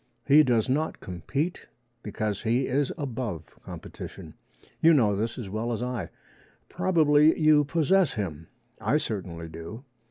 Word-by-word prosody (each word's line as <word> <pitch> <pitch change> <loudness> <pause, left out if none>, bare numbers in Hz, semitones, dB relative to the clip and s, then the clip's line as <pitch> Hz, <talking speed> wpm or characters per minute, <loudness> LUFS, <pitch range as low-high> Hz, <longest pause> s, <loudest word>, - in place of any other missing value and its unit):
He 145 +2 +7
does 120 -6 +2
not 150 +5 -1
compete, 135 - -4 0.3
because 105 -1 -3
he 120 +3 +1
is 135 +1 0
above 120 - -4 0.2
competition. - - -9 0.5
You 165 0 +6
know 105 -7 +3
this 110 +3 -2
as 120 -5 -5
well 110 +4 -3
as 115 +1 -2
I. 120 -9 -3 0.6
Probably 155 -3 +3
you 155 -1 +5
possess 170 +3 +2
him. 80 -7 -4 0.3
I 150 - +2
certainly 90 - -4
do. 85 +9 -9
125 Hz, 135 wpm, -27 LUFS, 105-150 Hz, 0.6 s, He